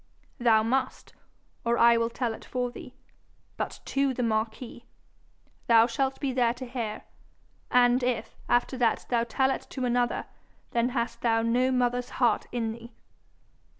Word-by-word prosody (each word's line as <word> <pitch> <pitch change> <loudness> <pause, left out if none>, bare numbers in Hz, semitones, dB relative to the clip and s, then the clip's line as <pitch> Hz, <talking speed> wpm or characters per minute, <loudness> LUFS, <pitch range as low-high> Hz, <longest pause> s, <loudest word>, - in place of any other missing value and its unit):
'Thou 225 -3 +4
must, 255 +3 -2 0.5
or 235 0 +1
I 235 0 +6
will 230 0 +1
tell 235 -1 -2
it - - -11
for 250 -1 -3
thee - - -11 0.6
but - - -5
to 275 -1 0
the 250 - -1
marquis. 225 +2 -3 0.8
Thou 230 -1 +6
shalt 265 +3 -1
be 275 -3 -1
there 240 -2 +2
to 255 +1 -7
hear, 235 -4 -5 0.7
and 245 0 +4
if, 245 -3 -2
after 245 +1 +1
that, 230 -3 +1
thou 235 -2 +2
tell 265 +2 +1
it - - -4
to 260 -2 -3
another, 245 0 0 0.5
then 235 +1 +1
hast 240 -2 -3
thou 225 -1 +2
no 245 +3 +2
mother's 245 -1 0
heart 240 -4 +2
in 230 -2 -2
thee.' 235 +1 -11
240 Hz, 155 wpm, -27 LUFS, 230-250 Hz, 0.8 s, I